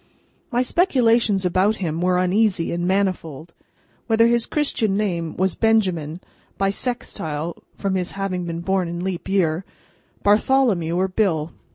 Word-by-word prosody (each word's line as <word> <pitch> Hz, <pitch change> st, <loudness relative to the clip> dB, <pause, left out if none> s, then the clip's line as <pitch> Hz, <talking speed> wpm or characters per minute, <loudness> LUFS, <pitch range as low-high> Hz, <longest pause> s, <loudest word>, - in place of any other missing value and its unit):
My 245 Hz, +1 st, +2 dB
speculations 235 Hz, -, +2 dB
about 185 Hz, +4 st, +2 dB
him 165 Hz, -5 st, -3 dB
were 180 Hz, 0 st, +2 dB
uneasy 185 Hz, -1 st, +1 dB
and 175 Hz, +1 st, -1 dB
manifold. 175 Hz, -5 st, -1 dB, 0.5 s
Whether 225 Hz, 0 st, +4 dB
his 235 Hz, 0 st, +2 dB
Christian 225 Hz, -9 st, 0 dB
name 170 Hz, -6 st, -2 dB
was 190 Hz, -1 st, +1 dB
Benjamin, 185 Hz, -8 st, +1 dB, 0.4 s
Bissextile 195 Hz, -, -3 dB
(from 195 Hz, -2 st, -2 dB
his 185 Hz, -1 st, -2 dB
having 195 Hz, -2 st, -3 dB
been 170 Hz, 0 st, -4 dB
born 190 Hz, 0 st, 0 dB
in 170 Hz, +1 st, -4 dB
Leap 190 Hz, -1 st, -4 dB
Year), 180 Hz, -3 st, +1 dB, 0.6 s
Bartholomew, 205 Hz, -5 st, +3 dB
or 185 Hz, +2 st, +1 dB
Bill. 180 Hz, -6 st, 0 dB
190 Hz, 135 wpm, -22 LUFS, 170-215 Hz, 0.6 s, Whether